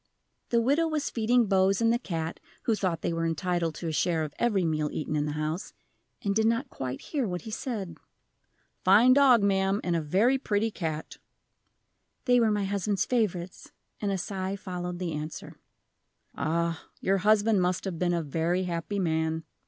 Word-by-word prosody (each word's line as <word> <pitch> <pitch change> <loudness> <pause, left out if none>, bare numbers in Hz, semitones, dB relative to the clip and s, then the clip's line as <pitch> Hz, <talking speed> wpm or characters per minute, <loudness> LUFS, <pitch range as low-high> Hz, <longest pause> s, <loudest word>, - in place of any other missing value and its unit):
The 235 - +3
widow 290 +7 +2
was 305 -3 -2
feeding 235 +1 +3
Bose 195 -1 +3
and 230 0 +3
the 240 - +1
cat 165 -7 -4 0.2
(who 230 - +2
thought 185 -6 -1
they - - 0
were 165 0 -1
entitled 165 0 -1
to 170 - -5
a - - -1
share 160 +1 +1
of 150 -2 -5
every 210 -7 +2
meal 155 -2 0
eaten 155 0 -3
in 150 0 0
the 150 - -2
house), 155 +4 -3 0.5
and 200 - +1
did 220 +2 +2
not 230 +4 0
quite 130 0 -4
hear 275 -7 -2
what 180 -2 -4
he 220 - -7
said. 205 -8 -4 0.8
"Fine 215 +7 +7
dog, 260 -5 +6
ma'am, 195 0 +2
and 175 -1 0
a 165 - +1
very 210 - +2
pretty 220 -3 0
cat." 160 -5 -4 1.1
"They 245 -1 +5
were 230 -2 +3
my 210 -1 +1
husband's 200 0 0
favorites," 190 -7 -2 0.3
and 205 -2 -1
a 195 - 0
sigh 190 +1 -3
followed 180 -2 -5
the 175 -2 -3
answer. 150 +1 -6 0.7
"Ah, 165 +1 -1 0.2
your 195 +1 +1
husband 210 0 +3
must 180 +1 0
have 180 -4 -4
been 175 -1 +1
a 170 - -1
very 165 +5 0
happy 175 +3 -3
man." 160 -3 0
190 Hz, 185 wpm, -28 LUFS, 165-215 Hz, 1.1 s, Fine